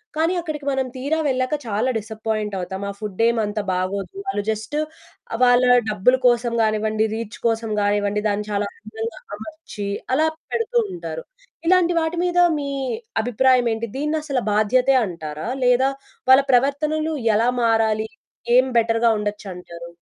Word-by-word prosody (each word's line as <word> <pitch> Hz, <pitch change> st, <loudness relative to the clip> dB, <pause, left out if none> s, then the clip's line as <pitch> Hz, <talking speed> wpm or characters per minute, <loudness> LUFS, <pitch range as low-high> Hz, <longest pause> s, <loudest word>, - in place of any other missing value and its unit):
కానీ, 325 Hz, +3 st, +1 dB
అక్కడికి 305 Hz, -4 st, -5 dB
మనం 265 Hz, -1 st, 0 dB
తీరా 280 Hz, +5 st, -1 dB
వెళ్ళాక 255 Hz, +2 st, 0 dB
చాలా 220 Hz, +3 st, 0 dB
డిసప్పాయింట్ 215 Hz, -1 st, -3 dB
అవుతాం. 190 Hz, +2 st, -5 dB
ఆ -, -, -2 dB
ఫుడ్డేం 225 Hz, +3 st, 0 dB
అంత 210 Hz, +1 st, -3 dB
బాగోదు. 185 Hz, +2 st, -2 dB
వాళ్ళు 390 Hz, -, -1 dB
జస్టు, 220 Hz, +7 st, -2 dB, 0.5 s
ఆహ్, 225 Hz, -, -3 dB
వాళ్ళ 245 Hz, 0 st, +5 dB, 0.2 s
డబ్బుల 215 Hz, +5 st, +3 dB
కోసం 240 Hz, -1 st, +2 dB
గానివ్వండి, 215 Hz, 0 st, +1 dB
రీచ్ 225 Hz, -1 st, -6 dB
కోసం 225 Hz, -1 st, -1 dB
గానివ్వండి, 205 Hz, 0 st, +1 dB
దాన్ని 205 Hz, +1 st, -2 dB
చాలా 205 Hz, 0 st, 0 dB
అందంగా 220 Hz, +1 st, -6 dB, 0.2 s
అమర్చి 230 Hz, -, -8 dB, 0.3 s
అలా 315 Hz, +3 st, +3 dB, 0.3 s
పెడుతూ 465 Hz, +1 st, 0 dB, 0.2 s
ఉంటారు. 360 Hz, +7 st, -6 dB, 0.4 s
ఇలాంటి 355 Hz, -1 st, +4 dB
వాటి 320 Hz, +2 st, -2 dB
మీద 355 Hz, 0 st, +1 dB, 0.2 s
మీ 280 Hz, -1 st, -3 dB, 0.5 s
అభిప్రాయమేంటి? 240 Hz, -1 st, +2 dB
దీన్నసల 300 Hz, -2 st, -1 dB
బాధ్యతే 250 Hz, +6 st, +3 dB
అంటారా? 155 Hz, -2 st, -6 dB, 0.2 s
లేదా, 250 Hz, +2 st, +4 dB, 0.4 s
వాళ్ళ 265 Hz, +1 st, +8 dB
ప్రవర్తనలు 300 Hz, +5 st, +1 dB, 0.2 s
ఎలా 230 Hz, +3 st, +3 dB
మారాలి? 220 Hz, -1 st, +2 dB, 0.5 s
ఏం 255 Hz, +1 st, +6 dB
బెటర్‌గా 230 Hz, 0 st, +2 dB
ఉండొచ్చంటారు. 180 Hz, -5 st, -6 dB
230 Hz, 135 wpm, -22 LUFS, 210-270 Hz, 0.5 s, వాళ్ళ